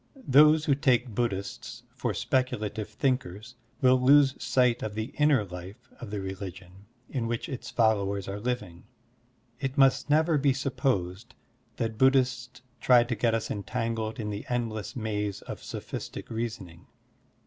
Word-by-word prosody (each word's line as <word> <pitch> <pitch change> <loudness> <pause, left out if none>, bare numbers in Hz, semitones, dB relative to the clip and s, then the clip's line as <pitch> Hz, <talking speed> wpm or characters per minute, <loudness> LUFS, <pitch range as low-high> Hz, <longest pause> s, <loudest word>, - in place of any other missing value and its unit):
Those 150 +3 +6
who 145 - +3
take 130 -4 +1
Buddhists 100 -4 -3
for - - -3
speculative 110 -5 -1
thinkers 115 -2 -2 0.3
will 130 0 +5
lose 135 +1 +6
sight 125 -2 +2
of 105 -1 -4
the 110 +3 -4
inner 150 -7 +4
life 95 +7 -11
of 120 - -8
the 105 0 -4
religion 95 0 -8 0.2
in 120 -4 -3
which 115 0 -3
its 130 -3 -6
followers 100 -4 +1
are 100 +1 -4
living. 105 -7 -4 0.7
It 135 +1 -3
must 135 +1 +4
never 155 +1 +3
be 140 -1 +3
sup 135 0 -3
posed 95 -4 -1 0.4
that 115 -2 -3
Buddhists 125 -2 +2 0.2
try 125 -1 +5
to 120 - -3
get 115 +1 +1
us 115 - -3
entangled 115 +1 -3
in 105 -1 -3
the 100 0 -5
endless 115 -2 -3
maze 105 -4 -3
of - - -8
sophistic - - -7
reasoning. 110 -7 -5
115 Hz, 150 wpm, -28 LUFS, 105-130 Hz, 0.7 s, Those